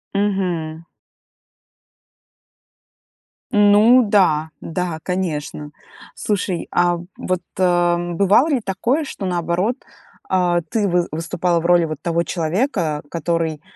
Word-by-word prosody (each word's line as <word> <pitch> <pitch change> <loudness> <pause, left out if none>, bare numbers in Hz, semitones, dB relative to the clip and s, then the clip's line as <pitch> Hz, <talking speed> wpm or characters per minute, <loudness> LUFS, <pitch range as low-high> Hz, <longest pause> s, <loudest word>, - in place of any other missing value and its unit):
Мгм. 180 -6 -1 2.7
Ну 210 +3 +6
да. 160 -6 +3
Да, 165 -1 -3
конечно. 150 -5 -3 0.4
Слушай, 195 -4 -2
а, 175 0 +2 0.2
вот, 185 -1 -2 0.2
э, 175 -1 +2
бывало 200 - +4
ли 265 -5 +1
такое, 235 +11 -1
что, 205 - -6
наоборот, 180 +5 0 0.5
а, 175 -2 +2
ты 205 +5 -1
вы 175 -1 +1
выступала 170 +2 -1
в 165 - -6
роли 175 -1 +4
вот 155 -2 -6
того 170 0 0
человека, 170 - -1
который, 165 -2 -2
175 Hz, 105 wpm, -20 LUFS, 165-195 Hz, 2.7 s, Ну